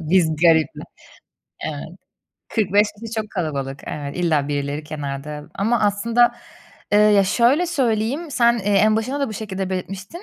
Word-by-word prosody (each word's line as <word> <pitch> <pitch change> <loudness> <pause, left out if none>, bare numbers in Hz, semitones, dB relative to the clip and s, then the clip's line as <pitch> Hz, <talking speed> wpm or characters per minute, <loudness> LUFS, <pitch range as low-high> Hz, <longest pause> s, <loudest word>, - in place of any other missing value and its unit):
Biz 160 -1 +2
garip 160 -2 +4
mi? - - -8 0.8
Evet. - - -5 0.6
45 205 -1 +2
kişi 230 0 -7
çok 215 -1 -3
kalabalık. 140 -7 -3
Evet, 140 -1 -5
illa 155 -5 +1
birileri 145 +1 -3
kenarda 150 0 -6
ama 225 +3 +1
aslında, 230 +4 +3 0.6
ııı, 210 - +6
ya 200 -1 +5
şöyle 250 - +3
söyleyeyim; 270 0 -1
sen, 235 -3 +3
eee, 200 - -7
en 215 +2 +4
başında 260 +6 -2
da 275 - 0
bu - - -6
şekilde 195 -3 -4
belirtmiştin. 190 - -5
200 Hz, 155 wpm, -21 LUFS, 155-230 Hz, 0.8 s, ııı